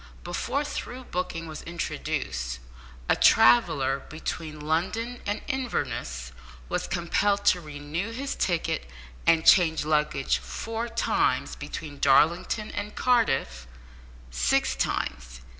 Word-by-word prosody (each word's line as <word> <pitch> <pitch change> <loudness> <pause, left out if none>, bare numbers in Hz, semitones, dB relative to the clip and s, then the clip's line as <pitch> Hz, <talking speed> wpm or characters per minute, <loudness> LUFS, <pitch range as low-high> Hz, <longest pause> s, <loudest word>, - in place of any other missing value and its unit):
Before 175 +11 -2
through 260 -3 -5
booking 180 -6 -3
was 155 -1 -7
introduced, 65 - -3 0.5
a - - +4
traveller 130 +3 +5
between 155 0 -5
London 190 +11 -1
and 205 +1 -2
Inverness 210 - -3 0.4
was - - -1
compelled 200 +3 +1
to 180 - +4
renew 150 +5 -4
his 270 +4 -3
ticket 165 - -1 0.4
and 165 -1 +4
change 160 -5 +5
luggage 150 -3 +1
four 225 +1 -4
times; - - +1
between 145 -3 -7
Darlington 170 +9 +3
and 205 +1 -5
Cardiff 135 - +1 0.6
six 65 0 +1
times. - - -3
165 Hz, 110 wpm, -27 LUFS, 140-210 Hz, 0.6 s, traveller